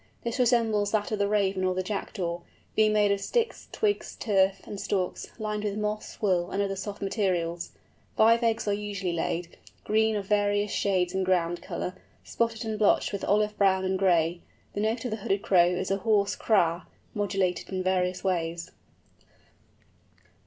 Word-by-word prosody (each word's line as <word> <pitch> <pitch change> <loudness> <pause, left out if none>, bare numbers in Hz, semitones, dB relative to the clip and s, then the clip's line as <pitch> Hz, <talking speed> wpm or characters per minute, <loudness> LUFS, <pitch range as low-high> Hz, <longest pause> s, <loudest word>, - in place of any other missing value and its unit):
This 235 +2 -3
resembles 225 -4 +2
that 210 0 0
of 215 - -1
the 200 - +2
Raven 200 -2 +1
or 185 0 +1
the 185 - -1
Jackdaw, 180 -3 -3 0.4
being 215 0 +4
made 210 -1 +3
of 200 0 0
sticks, 470 - -1
twigs, 420 -1 -1
turf, 195 -3 +2
and 205 - -7
stalks, 185 -3 -2
lined 210 -1 -3
with 205 -1 -2
moss, 210 0 -3
wool, 180 -4 +1
and 195 - -3
other 195 -1 -2
soft 205 +1 -6
materials. 180 -4 -1 0.5
Five 230 +2 +5
eggs 225 -2 0
are 205 - +2
usually 200 -3 -3
laid, 170 +1 -3 0.3
green 220 +1 +2
of 205 -2 -2
various 205 0 +1
shades 185 -3 +1
in 190 0 0
ground 175 -2 +1
colour, 180 - -4 0.3
spotted 230 0 -2
and 215 -1 -3
blotched 210 0 +3
with 200 - -3
olive 210 +1 +2
brown 190 -1 +3
and 190 0 0
gray. 175 -2 +2 0.3
The - - -3
note 225 +3 -1
of 245 - -2
the 220 - -2
Hooded 200 -1 -1
Crow 175 -3 +5
is 180 +2 -1
a 195 - +2
hoarse 205 -1 +2
kra, 175 -5 +1 0.3
modulated 195 -3 -1
in 185 -1 -2
various 185 -1 0
ways. 170 -3 -2
200 Hz, 175 wpm, -27 LUFS, 185-215 Hz, 0.5 s, Five